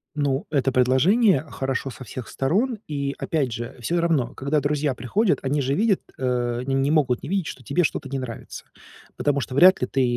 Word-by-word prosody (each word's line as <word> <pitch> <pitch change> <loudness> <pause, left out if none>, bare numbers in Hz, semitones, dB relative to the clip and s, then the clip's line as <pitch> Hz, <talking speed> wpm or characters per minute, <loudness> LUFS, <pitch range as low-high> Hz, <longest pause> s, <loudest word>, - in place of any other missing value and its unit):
Ну, 145 +3 0
это 135 -4 +1
предложение 145 - +4
хорошо 135 0 -3
со 125 +1 -9
всех 125 +1 -7
сторон, 210 - 0
и 140 -2 -3
опять 140 -7 -1
же, 120 +1 -6
всё 170 +9 -1
равно, 160 -8 +1
когда 140 +3 0
друзья 145 -1 0
приходят, 195 - 0
они 140 +2 0
же 135 +1 0
видят, 205 +2 +2 0.2
э, 125 -2 -1
они 135 +1 -3
не 135 +2 +1
могут 135 -6 +2
не - - -6
видеть, 190 -4 0
что 130 - -8
тебе 165 +6 +1
что-то 135 - -3
не 135 -1 -3
нравится, 120 -3 -8 0.5
потому 145 -1 0
что 130 -1 -5
вряд 185 +2 +7
ли 125 - 0
ты 135 - +1
140 Hz, 200 wpm, -23 LUFS, 130-160 Hz, 0.5 s, вряд